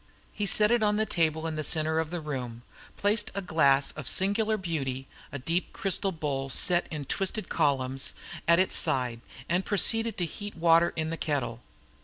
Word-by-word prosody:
He 205 -1 -3
set 210 +3 +4
it 240 -1 +2
on 210 -1 +2
the 220 - +1
table 160 -4 0
in 160 -1 -3
the 155 - -2
centre 160 0 +2
of 160 -1 -2
the 175 -1 -5
room, 125 -6 -6 0.3
placed 210 +1 0
a 200 - -2
glass 140 -5 +3
of 150 - -8
singular 215 +3 +2
beauty 135 -8 -4 0.2
a 140 - -5
deep 165 +7 -2
crystal 195 0 0
bowl 140 -5 -4
set 175 +6 +3
in 150 -4 -6
twisted 195 - -2
columns 135 -2 0 0.3
at 170 0 +5
its 185 +1 +2
side, 125 -3 +1 0.3
and 175 +3 0
proceeded 225 +3 +2
to 175 - 0
heat 205 +5 -8
water 170 0 +4
in 160 0 -3
a - - -4
kettle. 135 -7 -3
165 Hz, 185 wpm, -27 LUFS, 140-195 Hz, 0.3 s, at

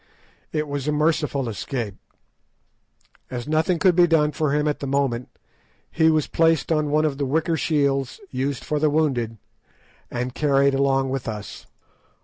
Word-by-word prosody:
It 155 -1 -1
was 140 -1 -4
a - - +2
merciful 150 -3 0
escape. 115 0 -4 1.4
As 125 +1 -5
nothing 160 +3 +1
could 180 0 +3
be 175 0 +6
done 155 -2 +3
for 150 0 -1
him 150 +1 +1
at 150 - -1
the 140 - -4
moment, 135 -3 -1 0.6
he 160 0 +3
was 155 -2 +2
placed 165 -1 +2
on 155 -2 +1
one 155 +1 +2
of 145 -2 -2
the 140 - 0
wicker 160 +4 +1
shields 140 - 0
used 135 +1 -2
for 150 - -1
the 155 0 +3
wounded, 130 -7 0 0.7
and 125 +1 -3
carried 140 -1 +2
along 135 -1 +1
with 135 -2 -3
us. 105 -2 -7
145 Hz, 160 wpm, -23 LUFS, 135-155 Hz, 1.4 s, be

